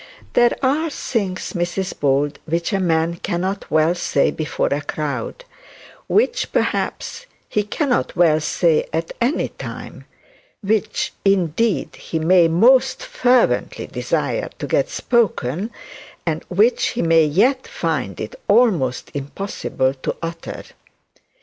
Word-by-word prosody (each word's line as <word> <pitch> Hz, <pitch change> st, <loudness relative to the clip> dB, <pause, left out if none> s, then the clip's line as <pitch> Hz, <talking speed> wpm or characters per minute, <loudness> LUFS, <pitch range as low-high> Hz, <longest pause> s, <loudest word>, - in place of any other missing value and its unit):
'There 240 Hz, 0 st, +4 dB
are 300 Hz, +5 st, +2 dB
things, 200 Hz, -10 st, -3 dB
Mrs 175 Hz, +1 st, -2 dB
Bold, 140 Hz, +1 st, +1 dB
which 170 Hz, +5 st, -1 dB
a 195 Hz, -, +2 dB
man 165 Hz, -1 st, +1 dB
cannot 185 Hz, +4 st, -3 dB
well 155 Hz, +2 st, +3 dB
say 160 Hz, -5 st, +1 dB
before 155 Hz, -1 st, -1 dB
a 145 Hz, +1 st, 0 dB
crowd; 150 Hz, -, -4 dB, 0.6 s
which 480 Hz, +3 st, +1 dB
perhaps -, -, -2 dB, 0.2 s
he 210 Hz, -, 0 dB
cannot 245 Hz, +5 st, -1 dB
well 165 Hz, -3 st, +4 dB
say 160 Hz, 0 st, +1 dB
at 165 Hz, +1 st, -2 dB
any 255 Hz, +7 st, +1 dB
time; -, -, -9 dB, 0.6 s
which 210 Hz, 0 st, 0 dB
indeed 195 Hz, +2 st, +1 dB
he 165 Hz, -, -4 dB
may 170 Hz, +2 st, +5 dB
most 230 Hz, +11 st, +4 dB
fervently 255 Hz, -, +1 dB
desire -, -, -2 dB
to -, -, -4 dB
get -, -, +1 dB
spoken, 205 Hz, -, 0 dB, 0.6 s
and -, -, -1 dB
which 475 Hz, +3 st, +3 dB
he 245 Hz, -, -2 dB
may 165 Hz, -1 st, +5 dB
yet 235 Hz, -, +2 dB
find 135 Hz, -, -2 dB
it 110 Hz, -, -5 dB
almost 200 Hz, -, +2 dB
impossible 140 Hz, -2 st, -2 dB
to 130 Hz, -, -4 dB
utter. 165 Hz, 0 st, -6 dB
175 Hz, 125 wpm, -20 LUFS, 155-235 Hz, 0.6 s, may